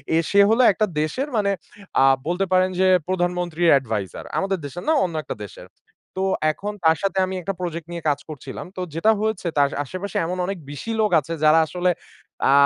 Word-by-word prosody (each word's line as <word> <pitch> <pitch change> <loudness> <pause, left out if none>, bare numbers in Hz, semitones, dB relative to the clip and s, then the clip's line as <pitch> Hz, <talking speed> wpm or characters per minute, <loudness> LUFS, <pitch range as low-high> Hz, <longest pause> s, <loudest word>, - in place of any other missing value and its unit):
এ - - +4
সে 200 - +4
হলো 230 +3 +4
একটা 215 +2 +1 0.2
দেশের 255 - -2
মানে 200 -1 +2 0.5
আ - - +6 0.2
বলতে 180 +3 0
পারেন 185 0 +4
যে 190 - +4 0.2
প্রধানমন্ত্রীর 175 -2 0
advisor। 110 -6 -4
আমাদের 195 0 0
দেশের 175 +6 -7
না - - +5
অন্য 170 -3 -5
একটা - - -5
দেশের। 100 - -11 0.5
তো 190 - -2 0.3
এখন 205 +6 -5
তার 160 -1 +5
সাথে 195 -1 0
আমি 185 0 -5
একটা 195 +3 -3
project 170 -2 -4
নিয়ে 170 -1 -6
কাজ 145 -1 0
করছিলাম। 135 -3 -7
তো 185 - -4
যেটা 165 +8 +3
হয়েছে 215 -5 -1
তার 140 -1 +5 0.2
আশেপাশে 185 +7 -5
এমন 180 +2 -3
অনেক 195 +1 -3
বেশি 145 +10 -5
লোক 210 - +2
আছে 165 +2 -6
যারা 155 +1 +6
আসলে 180 +1 +1 0.6
আ - - +5
180 Hz, 195 wpm, -22 LUFS, 160-195 Hz, 0.6 s, আ